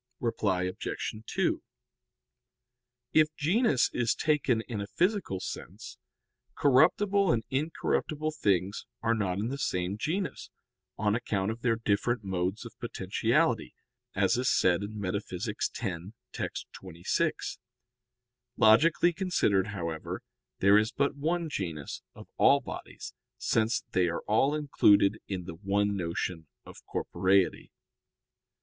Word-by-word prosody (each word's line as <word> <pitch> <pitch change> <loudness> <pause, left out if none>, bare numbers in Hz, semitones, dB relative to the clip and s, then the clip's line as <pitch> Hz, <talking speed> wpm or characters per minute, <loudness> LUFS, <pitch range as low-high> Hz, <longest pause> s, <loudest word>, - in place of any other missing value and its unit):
Reply 100 -6 0
Obj. 90 0 -3
2: - - 0 1.5
If 155 0 +4
genus 165 - +2
is 120 -3 +1
taken 145 -7 +1
in 110 -3 -5
a 100 - -5
physical 180 - 0
sense, - - -8 0.6
corruptible 185 +8 +4
and 115 - +1
incorruptible 155 +1 -1
things 100 - 0 0.2
are 115 - +3
not 95 -5 -1
in 105 +4 -1
the 140 +2 -4
same 95 -5 -1
genus, 170 - -3 0.5
on 105 0 +1
account 105 -3 -1
of 115 +1 -7
their 115 -2 +2
different 110 +1 0
modes 95 +2 -2
of - - -9
potentiality, - - 0 0.4
as - - +2
is 125 - +1
said 90 0 +3
in 105 +1 -6
Metaph. 95 -2 -3
x, - - -1 0.6
text. - - -4
26. 85 -2 -2 1.0
Logically 155 +10 +5
considered, 160 - +1
however, 85 -6 -5 0.3
there 100 +2 +6
is 110 +1 0
but 140 0 0
one 165 +4 -1
genus 85 - -4
of - - -12
all - - +6
bodies, - - -8 0.2
since 110 +1 +1
they 90 -1 +2
are 85 - -2
all 135 +8 +2
included 110 -8 +4
in 95 -2 -3
the 85 - -7
one 100 +3 0
notion 85 -2 -3 0.2
of - - -13
corporeity. 95 0 +1
110 Hz, 125 wpm, -29 LUFS, 95-145 Hz, 1.5 s, there